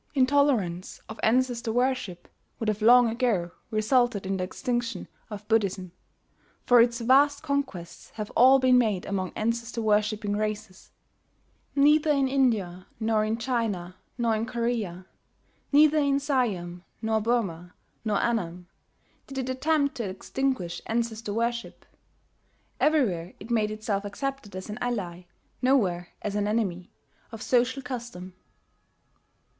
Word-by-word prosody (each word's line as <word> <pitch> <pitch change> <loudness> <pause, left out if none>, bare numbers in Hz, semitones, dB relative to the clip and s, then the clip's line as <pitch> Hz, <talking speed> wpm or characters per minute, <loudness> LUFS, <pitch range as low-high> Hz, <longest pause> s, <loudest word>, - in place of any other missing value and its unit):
Intolerance 255 -10 +1
of 220 - -9
ancestor 240 0 +1
worship 245 -7 -1 0.3
would 225 - -1
have 215 0 -2
long, 245 +2 +7
ago 225 -7 0 0.2
resulted 220 -1 +1
in 190 0 -1
the 185 - -2
extinction 240 +1 -3 0.2
of 210 -1 -8
Buddhism; 195 -5 0 0.7
for 245 -1 +7
its 235 0 +2
vast 280 +5 +4
conquests 280 - -4
have 215 -1 -5
all 260 +3 +6
been 255 -1 +5
made 210 -6 0
among 190 -2 -2
ancestor 230 +2 -2
worshipping 210 -1 +1
races. 215 -2 -4 0.9
Neither 300 +2 +4
in 275 -2 +3
India 220 -10 0
nor 220 -1 +1
in 215 +1 -1
China 225 -7 -2 0.2
nor 230 -2 +1
in 220 +1 -2
Korea, 230 -7 -2 0.7
neither 305 +1 +5
in 280 -1 +2
Siam 205 -12 -1 0.2
nor 220 -1 0
Burmah 195 -7 -1 0.3
nor 215 -2 0
Annam, 180 -7 -2 0.6
did 275 - -8
it 260 -1 -2
attempt 285 +2 +1
to 225 -5 -3
extinguish 200 -2 -2
ancestor 225 -1 -2
worship, 235 +2 -3 0.9
Everywhere 195 - +1
it 235 - -9
made 215 -2 +2
itself 215 -2 -2
accepted 270 -1 -5
as 185 - -6
an 210 +2 -6
ally, 185 -8 -3 0.3
nowhere 195 -10 +2 0.2
as 210 - -2
an 205 0 0
enemy, 195 -5 -1 0.4
of 225 -2 -7
social 255 +2 +1
custom. 235 -8 -7
225 Hz, 130 wpm, -27 LUFS, 200-255 Hz, 0.9 s, long